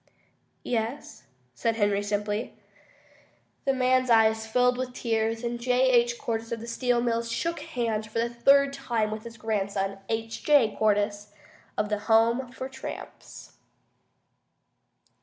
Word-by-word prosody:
"Yes," 235 +3 -3 0.3
said 225 - -1
Henry, 205 -2 +1
simply. 205 +2 -2 1.1
The 270 - +3
man's 255 0 +2
eyes 220 -1 +4
filled 250 +2 +3
with 250 0 -4
tears, 225 -1 -1
and 240 0 -3
J. 250 +2 +2
H. 240 -1 +3
Cordyce 225 -1 -3
of 230 - -2
the 230 - -8
Steel 240 +1 0
Mills 230 -1 -1
shook 335 +8 -2
hands 235 -8 -2
for 220 - -6
the 230 +1 +2
third 275 +4 +4
time 235 -6 -1
with 215 +1 -6
his 230 -1 -9
grandson, 200 -3 -2
H. 225 0 -3
J. 285 -7 +4
Cordyce 205 -1 0 0.5
of 210 0 0
the 210 -1 -1
Home 235 +3 +3
for 260 0 -6
Tramps. 265 0 -10
230 Hz, 140 wpm, -27 LUFS, 220-250 Hz, 1.1 s, eyes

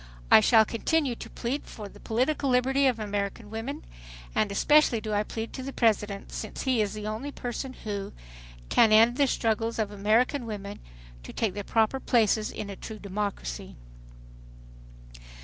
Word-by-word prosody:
I - - +10
shall 220 - +5
continue 275 +5 0
to - - -9
plead 255 +5 -3
for 210 -2 -8
the - - -15
political 265 +5 0
liberty 265 +2 +3
of 250 -3 +1
American 205 0 -4
women 220 - -5 0.5
and 210 - +1
especially 295 +3 +4
do 215 -1 -4
I 205 - +2
plead 225 +1 -5
to - - -5
the 270 +1 -5
President, 210 -5 0
since - - -5
he 255 -4 +2
is 210 0 -1
the 210 - -6
one 220 +7 -4
person 255 +2 -5
who... 205 -5 -5 0.6
can 225 -2 +5
end 230 +3 +6
the 285 -1 +4
struggles 225 -1 0
of 215 -2 -1
American 230 +6 +1
women 205 -2 -6 0.4
to - - -10
take 220 -5 -1
their 205 +1 -5
proper 225 +5 +1
places 220 -4 +2
in 210 - -6
a - - -6
true 220 +3 -8
democracy." 200 - -4
220 Hz, 165 wpm, -27 LUFS, 205-250 Hz, 0.6 s, I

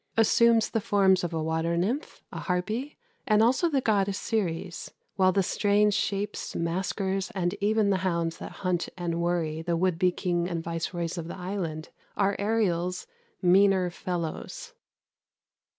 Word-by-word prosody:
assumes 230 0 +4
the 225 - 0
forms 195 -3 +3
of 175 - -2
a 160 -1 -2
water 160 +1 0
nymph, 230 - -2
a - - -6
harpy, 215 +10 -2 0.3
and 215 -2 +4
also 260 +9 +3
the 280 -4 +1
goddess 200 -4 +1
Ceres; 175 -6 -2 0.3
while 185 -1 +4
the 195 +1 +2
strange 205 +2 +2
shapes, 200 +1 -2
masquers, 190 +3 -1
and 175 -1 0
even 210 0 +2
the 190 - +2
hounds 170 -3 -1
that - - -7
hunt 180 -1 0
and 170 -1 -2
worry 165 -2 -1
the 170 0 -1
would 180 -1 +1
be 180 0 +4
king 175 -1 -1
and 165 -2 -3
viceroys 170 +1 -3
of 165 - -6
the 175 - -7
island, 180 -4 -4 0.3
are 200 0 +2
Ariel's 185 -4 0 0.4
"meaner 185 0 +4
fellows." 180 - -5
185 Hz, 150 wpm, -27 LUFS, 170-205 Hz, 0.4 s, assumes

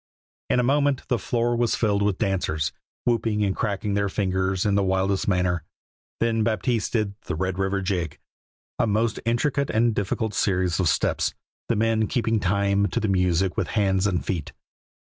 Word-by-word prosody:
In 125 - +3
a - - +3
moment 140 +1 +1
the 125 - +1
floor 120 0 0
was 120 -1 +1
filled 105 -3 +1
with 100 -2 +1
dancers, 80 -6 0 0.3
whooping 115 -3 +1
and 95 - 0
cracking 105 -1 -1
their 100 0 +1
fingers 95 -1 0
in 105 - +2
the 100 - +3
wildest 95 +1 0
manner. 90 -3 +1 0.6
Then 115 -1 +1
Baptiste 110 +1 0
did 105 -4 0
the - - -2
"Red 95 +2 -2
River 95 0 0
Jig," 90 -5 -2 0.6
a - - +3
most 110 +1 +1
intricate 135 +4 +1
and 115 +1 +2
difficult 105 +2 -1
series 90 -4 +1
of - - +3
steps, - - 0 0.3
the 115 - +2
men 110 0 +2
keeping 115 -1 0
time 100 +1 +2
to 90 - -1
the 110 - -1
music 90 -1 +1
with - - -1
hands 95 -1 +2
and 90 -4 -1
feet. 85 -6 -3
100 Hz, 175 wpm, -24 LUFS, 95-115 Hz, 0.6 s, In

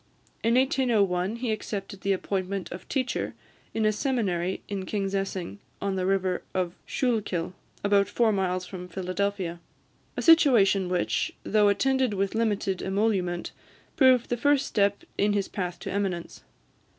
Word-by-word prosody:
In 230 +1 +3
1801, 220 -7 +2
he 235 -1 -2
accepted 200 -2 -5
the 200 - 0
appointment 190 0 -2
of 180 +1 -8
teacher 255 -3 -1 0.4
in 220 - 0
a 215 - +4
seminary 200 - -1
in 195 -2 -4
Kingsessing, 195 -2 -2 0.2
on 200 -1 -1
the 185 -1 -1
river 190 -2 +1 0.5
Schuylkill, 210 -9 -1 0.3
about 200 0 +3
four 230 -2 +2
miles 185 -2 0
from 180 -1 -8
Philadelphia, 185 -1 -2 0.6
a - - -1
situation 220 - +5
which, 180 -1 0
though 210 -1 +3
attended 260 +1 +2
with 195 0 0
limited 205 -4 0
emolument, 190 -3 0 0.4
proved 255 -4 +4
the 245 - +1
first 285 +2 +3
step 200 -1 +1 0.2
in 205 0 +3
his 200 -1 0
path 180 -3 -4
to - - -5
eminence. 190 -4 -3
200 Hz, 140 wpm, -27 LUFS, 185-225 Hz, 0.6 s, situation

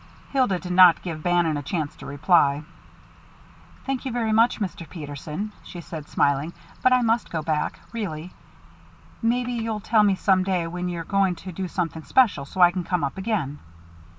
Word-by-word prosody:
Hilda 255 -9 +2
did 180 0 -7
not 180 -2 +7
give 165 -4 -5
Bannon 175 -3 +2
a - - -3
chance 150 0 -3
to - - -10
reply. 145 0 +3 1.2
"Thank 270 -2 -2
you 265 - -3
very 230 -2 -1
much, 230 +3 +3
Mr. 180 -5 -5
Peterson," 155 +5 -6
she 175 - -10
said, 160 -3 -8
smiling, 145 +4 +1 0.3
"but 255 - +4
I 250 -1 +4
must 230 +1 +1
go 160 -2 -3
back, 155 -1 -1
really. 180 -6 -5 0.9
Maybe 245 +1 0
you'll 225 -2 -2
tell 220 +1 +3
me 200 -2 +4
some 190 0 +3
day 185 -3 0
when 180 +2 -4
you're 170 -1 -4
going 195 +1 +1
to 185 - -5
do 185 +2 -4
something 165 -3 -3
special, 210 - +3
so 185 +6 -4
I 175 0 +8
can 180 0 -3
come 175 -1 -1
up 140 - -2
again." 190 -9 -2
180 Hz, 180 wpm, -24 LUFS, 160-215 Hz, 1.2 s, I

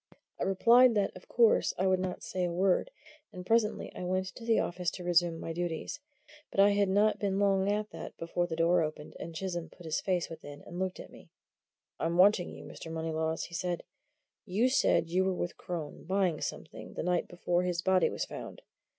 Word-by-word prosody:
I - - 0
replied 235 +5 +6
that, 205 -1 +1
of 185 - -13
course, 230 -2 +3
I 190 - +1
would 190 -1 +3
not 185 -1 -4
say 185 - -2
a 175 - 0
word; 185 - +2 0.4
and 180 -3 -8
presently 225 +1 +1
I - - -5
went 185 +1 -1
into 230 - -11
the 230 -1 +3
office 175 0 0
to 180 - -7
resume 175 -1 +2
my 165 - -4
duties. 175 - -3 0.5
But - - -4
I 200 +1 +7
had 200 -1 +2
not 205 +3 +3
been 195 -2 0
long 195 0 +2
at 210 +1 -2
that - - -8
before 175 +1 -1
the 165 - -3
door 165 +2 +3
opened, 155 -1 -5
and 165 0 -7
Chisholm 175 -1 -4
put 175 - -15
his 160 -1 -1
face 180 -3 0
within 145 -3 -10
and 175 - -8
looked 185 -1 -2
at - - -10
me. - - -15 0.7
"I'm 170 +1 0
wanting 185 -1 +5
you, - - -10
Mr. 165 - -9
Moneylaws," 160 0 -2
he - - -9
said. 175 0 -2 0.6
"You 220 +6 +1
said 255 -9 +3
you 185 +2 +3
were 190 -1 0
with 175 -1 -3
Crone, 165 -5 -6
buying 185 -3 +1
something, - - -6
that - - -3
night 180 0 +1
before 175 0 0
his 180 -1 -1
body 190 -1 +4
was - - -3
found. - - -9
180 Hz, 210 wpm, -31 LUFS, 170-195 Hz, 0.7 s, I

